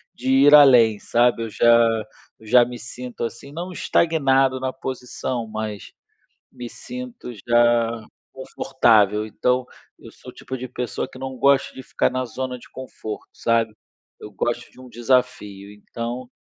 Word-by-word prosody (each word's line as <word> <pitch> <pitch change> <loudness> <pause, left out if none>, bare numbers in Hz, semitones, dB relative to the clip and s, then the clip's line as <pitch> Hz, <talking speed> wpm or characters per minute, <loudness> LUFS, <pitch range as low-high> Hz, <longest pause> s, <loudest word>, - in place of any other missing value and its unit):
de 130 +1 -2
ir 140 +2 +7
além, 120 -7 +6
sabe, 120 +1 +1
eu 115 - -5
já 120 - +1 0.7
eu 110 - -16
já 125 +2 +6
me 120 0 -8
sinto, 125 +1 -8
assim, 120 +4 -8
não 175 +5 -6
estagnado 135 -7 +2
na 130 0 -2
posição, 125 -2 -5
mas 110 -2 -6 0.6
me 120 -1 -8
sinto 250 - -9 0.2
já 120 -1 +3 0.3
confortável. 110 -5 +1
Então, 125 +3 -1 0.3
eu - - -13
sou - - -13
o - - -22
tipo 130 - -7
de 130 +1 -6
pessoa 125 -2 -4
que - - -13
não 130 0 -6
gosta 140 +1 +2
de 130 - -9
ficar - - 0
na 130 0 -2
zona 125 +1 -5
de - - -17
conforto, 110 -4 -8
sabe, 115 -2 0 0.5
eu 105 - -9
gosto 120 +4 -3
de - - -18
um 130 - -12
desafio, 115 -5 -1
então 120 +4 -7
125 Hz, 155 wpm, -22 LUFS, 115-130 Hz, 0.7 s, ir